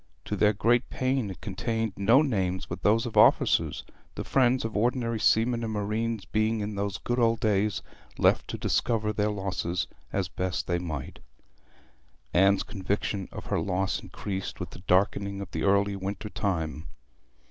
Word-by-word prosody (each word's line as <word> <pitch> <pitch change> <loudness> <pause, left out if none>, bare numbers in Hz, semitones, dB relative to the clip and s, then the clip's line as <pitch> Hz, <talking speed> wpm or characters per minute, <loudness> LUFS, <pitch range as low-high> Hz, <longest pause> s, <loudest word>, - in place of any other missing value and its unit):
To - - -2
their 105 - +4
great 120 +4 +2
pain 130 -4 0
it 95 - -9
contained 115 -3 -2
no 115 +9 +5
names 95 -9 -1
but 85 0 -6
those 115 +3 +3
of 120 - -5
officers, - - +4 0.3
the - - -4
friends 130 -2 +2
of 115 - -4
ordinary 115 +1 0
seamen 115 +2 +3
and 110 - -2
marines 110 0 -2
being 110 +3 0
in 105 0 -3
those 100 -1 -2
good 120 +1 -2
old 115 -1 +3
days 105 -2 +1 0.3
left - - +3
to - - -4
discover 110 -3 0
their 105 +1 +1
losses 95 -3 -2 0.3
as 95 -3 -1
best 90 +1 -2
they 85 0 0
might. 80 -6 -5 1.1
Anne's 95 +2 +4
conviction 100 -1 -3
of - - -8
her - - 0
loss 95 0 0
increased 95 -2 -5
with - - -5
the - - -10
darkening 100 +1 +2
of 100 - -7
the 80 - -3
early 100 +1 +3
winter 100 +2 -5
time. 80 -6 -2
105 Hz, 165 wpm, -28 LUFS, 95-115 Hz, 1.1 s, no